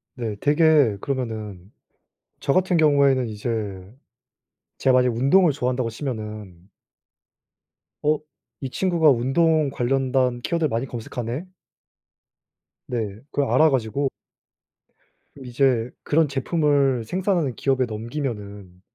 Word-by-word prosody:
네 115 Hz, -4 st, -4 dB
되게 145 Hz, -7 st, +4 dB
그러면은 110 Hz, -8 st, -5 dB, 0.7 s
저 140 Hz, -, 0 dB
같은 185 Hz, 0 st, +2 dB
경우에는 140 Hz, -5 st, +3 dB
이제 110 Hz, +2 st, -5 dB, 1.3 s
제가 130 Hz, -, +3 dB
만약에 125 Hz, -2 st, +3 dB
운동을 145 Hz, +8 st, +4 dB
좋아한다고 125 Hz, -3 st, -1 dB
치면은 105 Hz, -, -7 dB, 1.4 s
'어 150 Hz, 0 st, +2 dB, 0.4 s
이 135 Hz, -, -4 dB
친구가 170 Hz, 0 st, +2 dB
운동 145 Hz, +4 st, +2 dB
관련된 130 Hz, -1 st, 0 dB
키워드를 165 Hz, +3 st, 0 dB
많이 115 Hz, +2 st, -1 dB
검색하네.' 120 Hz, +6 st, -5 dB, 1.4 s
네. 110 Hz, -4 st, -3 dB
그걸 140 Hz, -1 st, 0 dB
알아 160 Hz, 0 st, +5 dB
가지고 135 Hz, +1 st, 0 dB, 1.3 s
이제 125 Hz, -2 st, +1 dB
그런 160 Hz, +1 st, +2 dB
제품을 140 Hz, -2 st, +1 dB
생산하는 175 Hz, -, -1 dB
기업에 130 Hz, 0 st, +1 dB
넘기면은 105 Hz, -6 st, -6 dB
130 Hz, 245 characters per minute, -23 LUFS, 115-145 Hz, 1.4 s, 알아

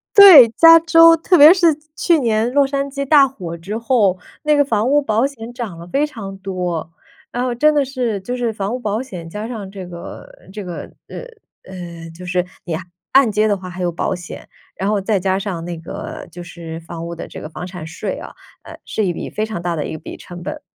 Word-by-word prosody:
对， 360 Hz, -, +10 dB
加 330 Hz, 0 st, +9 dB
州， 330 Hz, 0 st, +6 dB
特 345 Hz, +3 st, +2 dB
别 300 Hz, +3 st, +10 dB
是 360 Hz, -2 st, +3 dB, 0.3 s
去 335 Hz, -2 st, +2 dB
年 230 Hz, -2 st, +1 dB
洛 280 Hz, +1 st, +3 dB
杉 275 Hz, 0 st, -2 dB
矶 280 Hz, 0 st, -3 dB
大 280 Hz, 0 st, +6 dB
火 180 Hz, -10 st, -8 dB
之 195 Hz, +6 st, -5 dB
后， 225 Hz, -6 st, +1 dB, 0.2 s
那 300 Hz, 0 st, +3 dB
个 285 Hz, -, +5 dB
房 225 Hz, -5 st, 0 dB
屋 290 Hz, +1 st, +4 dB
保 225 Hz, -2 st, +1 dB
险 240 Hz, -4 st, -7 dB
涨 230 Hz, -8 st, -6 dB
了 170 Hz, -, -10 dB
非 275 Hz, +11 st, +1 dB
常 200 Hz, -10 st, -8 dB
多。 180 Hz, -4 st, -4 dB, 0.4 s
然 245 Hz, -, -3 dB
后 245 Hz, -1 st, -2 dB
真 305 Hz, +5 st, +4 dB
的 290 Hz, -2 st, +2 dB
是 250 Hz, -6 st, -2 dB
就 245 Hz, +6 st, -5 dB
是 240 Hz, -2 st, -1 dB
房 210 Hz, +1 st, -3 dB
屋 -, -, -5 dB
保 215 Hz, -1 st, -2 dB
险 180 Hz, -10 st, -8 dB
加 210 Hz, +5 st, -6 dB
上 220 Hz, -5 st, -6 dB
这 190 Hz, -2 st, -8 dB
个 175 Hz, -, -9 dB, 0.2 s
这 205 Hz, 0 st, -7 dB
个 175 Hz, -1 st, -6 dB, 0.3 s
呃 -, -, -8 dB, 0.4 s
呃， 170 Hz, -3 st, -9 dB
就 180 Hz, +2 st, -11 dB
是 180 Hz, 0 st, -1 dB, 0.2 s
你 170 Hz, -, -2 dB, 0.4 s
按 265 Hz, -4 st, +5 dB
揭 215 Hz, +1 st, +2 dB
的 205 Hz, -, +2 dB
话 185 Hz, -1 st, -9 dB
还 180 Hz, +1 st, -8 dB
有 175 Hz, -, 0 dB
保 170 Hz, +2 st, -2 dB
险， 175 Hz, -2 st, -9 dB, 0.3 s
然 195 Hz, -, -2 dB
后 210 Hz, -1 st, +1 dB
再 200 Hz, +2 st, 0 dB
加 190 Hz, +1 st, 0 dB
上 190 Hz, -5 st, -4 dB
那 175 Hz, 0 st, -5 dB
个 195 Hz, +5 st, -8 dB
就 175 Hz, -, -9 dB
是 165 Hz, -1 st, -8 dB
房 165 Hz, 0 st, -7 dB
屋 170 Hz, -, -6 dB
的 170 Hz, -, -7 dB
这 -, -, -9 dB
个 -, -, -7 dB
房 165 Hz, +2 st, -7 dB
产 180 Hz, -3 st, -8 dB
税 160 Hz, -, -5 dB
啊， -, -, -10 dB, 0.3 s
呃， -, -, -11 dB
是 215 Hz, -, -2 dB
一 180 Hz, -, 0 dB
笔 -, -, -6 dB
非 215 Hz, -, -2 dB
常 215 Hz, -6 st, -5 dB
大 175 Hz, -1 st, -2 dB
的 150 Hz, -, -3 dB
一 155 Hz, -, -6 dB
笔 155 Hz, -, -9 dB
成 175 Hz, -1 st, -10 dB
本。 -, -, -6 dB
205 Hz, 250 characters per minute, -19 LUFS, 175-260 Hz, 0.4 s, 对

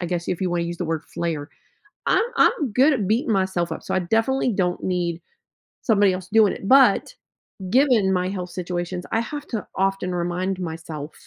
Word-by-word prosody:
I 175 Hz, -, -2 dB
guess, 175 Hz, -1 st, -3 dB
if 180 Hz, -, -2 dB
you 185 Hz, -, 0 dB
wanna 175 Hz, -1 st, 0 dB
use 170 Hz, 0 st, -4 dB
the 180 Hz, -, -2 dB
word 165 Hz, -1 st, -2 dB
flare 160 Hz, -4 st, -4 dB, 0.6 s
I'm -, -, +4 dB
I'm 275 Hz, -8 st, +3 dB
good 280 Hz, +4 st, +5 dB
at 210 Hz, -7 st, -1 dB
beating 225 Hz, +3 st, +1 dB
myself 190 Hz, -4 st, 0 dB
up, -, -, -5 dB
so -, -, -4 dB
I 185 Hz, -, +2 dB
definitely 225 Hz, +7 st, +1 dB
don't 180 Hz, -2 st, -1 dB
need 175 Hz, -2 st, -1 dB, 0.6 s
somebody 205 Hz, -5 st, +3 dB
else 185 Hz, 0 st, -6 dB
doing 220 Hz, -2 st, +5 dB
it, -, -, -7 dB
but 270 Hz, 0 st, +5 dB, 0.6 s
given 245 Hz, -6 st, +4 dB
my 180 Hz, 0 st, 0 dB
health 185 Hz, -2 st, -4 dB
situations, 180 Hz, 0 st, -4 dB
I 225 Hz, -, +2 dB
have 290 Hz, +4 st, -6 dB
to 220 Hz, -4 st, -4 dB
often 190 Hz, -2 st, 0 dB
remind 180 Hz, +2 st, -2 dB
myself, 160 Hz, -3 st, -6 dB
185 Hz, 190 wpm, -23 LUFS, 175-220 Hz, 0.6 s, good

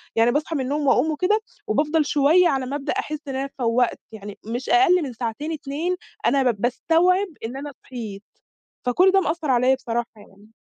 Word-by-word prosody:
يعني 230 Hz, +1 st, +4 dB
باصحى 305 Hz, +3 st, -1 dB
من 270 Hz, -, 0 dB
النوم 285 Hz, +2 st, -1 dB
وأقوم 280 Hz, +4 st, +3 dB
وكده 365 Hz, +8 st, +1 dB, 0.3 s
وبافضل 300 Hz, +7 st, +1 dB
شوية 310 Hz, +6 st, +4 dB
على 265 Hz, -2 st, 0 dB
ما 280 Hz, +3 st, -3 dB
بدأ 275 Hz, -, -3 dB
أحس 305 Hz, -1 st, -3 dB
إن 270 Hz, -, -4 dB
أنا 275 Hz, +1 st, -2 dB
فوَّقت، 240 Hz, 0 st, +1 dB
يعني 205 Hz, -2 st, -9 dB
مش 240 Hz, +4 st, -4 dB
أقل 365 Hz, 0 st, +5 dB
من 260 Hz, -4 st, -5 dB
ساعتين 240 Hz, +7 st, -4 dB
2 310 Hz, +5 st, -3 dB, 0.3 s
أنا 275 Hz, -1 st, +3 dB
با 250 Hz, -, +3 dB
باستوعب 330 Hz, -, +2 dB, 0.2 s
إن 250 Hz, +4 st, -5 dB
أنا 285 Hz, 0 st, -7 dB
صحيت. 220 Hz, -5 st, -7 dB, 0.6 s
فكل 360 Hz, +10 st, +4 dB
ده 390 Hz, -, +5 dB
مأثر 320 Hz, -4 st, -2 dB
عليَّ 255 Hz, +1 st, +4 dB
بصراحة 240 Hz, -1 st, -3 dB
يعني. 205 Hz, 0 st, -18 dB
275 Hz, 185 wpm, -23 LUFS, 240-320 Hz, 0.6 s, أقل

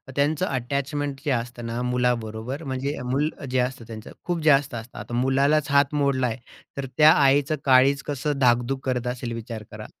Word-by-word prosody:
त्यांचं 150 Hz, +5 st, +1 dB
अटॅचमेंट 140 Hz, +1 st, -3 dB
जे 145 Hz, -, +1 dB
असतं 120 Hz, -1 st, -3 dB
ना 115 Hz, +1 st, -3 dB
मुलाबरोबर, 125 Hz, +1 st, -2 dB
म्हणजे 135 Hz, +1 st, -3 dB, 0.2 s
मूल 145 Hz, +4 st, +1 dB, 0.2 s
जे 130 Hz, -, +1 dB
असतं 125 Hz, -1 st, -2 dB
त्यांचं 110 Hz, -1 st, -9 dB
खूप 175 Hz, -1 st, -1 dB
जास्त 145 Hz, -4 st, +4 dB
असतं. 115 Hz, +1 st, -8 dB
आता -, -, -8 dB
मुलालाच 135 Hz, +4 st, +2 dB
हात 140 Hz, 0 st, +3 dB
मोडलाय, 130 Hz, -5 st, +1 dB, 0.4 s
तर 140 Hz, -, -3 dB
त्या 155 Hz, 0 st, +8 dB
आईचं 145 Hz, 0 st, +3 dB
काळीज 135 Hz, +1 st, +5 dB
कसं 145 Hz, 0 st, -2 dB
धाकधूक 125 Hz, +1 st, +1 dB
करत 125 Hz, -2 st, -1 dB
असेल 125 Hz, -1 st, -4 dB
विचार 115 Hz, -1 st, -6 dB
करा. -, -, -8 dB
130 Hz, 170 wpm, -24 LUFS, 120-140 Hz, 0.4 s, त्या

